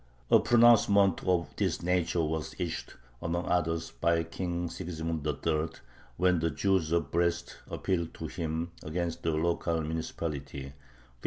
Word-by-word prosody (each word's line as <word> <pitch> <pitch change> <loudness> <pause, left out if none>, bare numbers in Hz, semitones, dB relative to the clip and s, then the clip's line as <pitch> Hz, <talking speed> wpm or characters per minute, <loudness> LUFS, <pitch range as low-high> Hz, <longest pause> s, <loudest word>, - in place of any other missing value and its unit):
A - - +8
pronouncement 110 -5 +5
of 90 -3 +2
this - - 0
nature 90 -1 +1
was 80 0 -2
issued, 85 -2 -4 0.3
among 85 +1 -1
others, 80 -2 0
by 85 0 +1
King 85 +1 -3
Sigismund 80 -3 -4
III., 75 +2 -1 0.4
when 90 -1 +3
the 85 +1 +1
Jews 80 +2 +1
of 85 -4 +1
Brest 85 0 0
appealed 85 -3 -1
to 80 - -6
him 80 +1 -3
against 85 +1 -3
the 85 - 0
local 85 +1 0
municipality 75 -3 -4
(1592). 70 - -8
85 Hz, 140 wpm, -30 LUFS, 80-90 Hz, 0.4 s, A